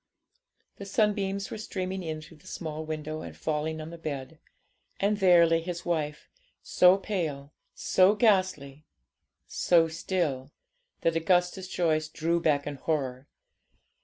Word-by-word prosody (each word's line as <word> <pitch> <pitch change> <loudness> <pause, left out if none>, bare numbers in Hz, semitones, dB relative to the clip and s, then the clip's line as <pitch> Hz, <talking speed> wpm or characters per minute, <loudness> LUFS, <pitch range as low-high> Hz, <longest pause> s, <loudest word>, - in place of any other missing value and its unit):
The 200 - -8
sunbeams 200 -1 0
were - - -5
streaming 190 -2 -4
in 155 -2 -5
through 165 0 -15
the 185 - -19
small 155 -3 -5
window, 155 0 -5
and - - -9
falling 155 +1 -2
on 155 +1 -7
the 170 - -10
bed. 150 0 -6 0.6
And 205 +1 +1
there 175 -3 +6
lay 165 0 +2
his 175 0 -6
wife, 150 -3 -2 0.4
so 180 +1 +5
pale, 155 -8 -4 0.2
so 190 +3 +4
ghastly, 185 - +1 0.6
so 165 -2 +3
still, 160 -5 -2 0.5
that 165 - +1
Augustus 180 +3 +1
Joyce 160 -4 0
drew 165 +2 -1
back 145 -3 +2
in 145 -1 -5
horror. 135 -3 -2
165 Hz, 135 wpm, -28 LUFS, 155-185 Hz, 0.6 s, there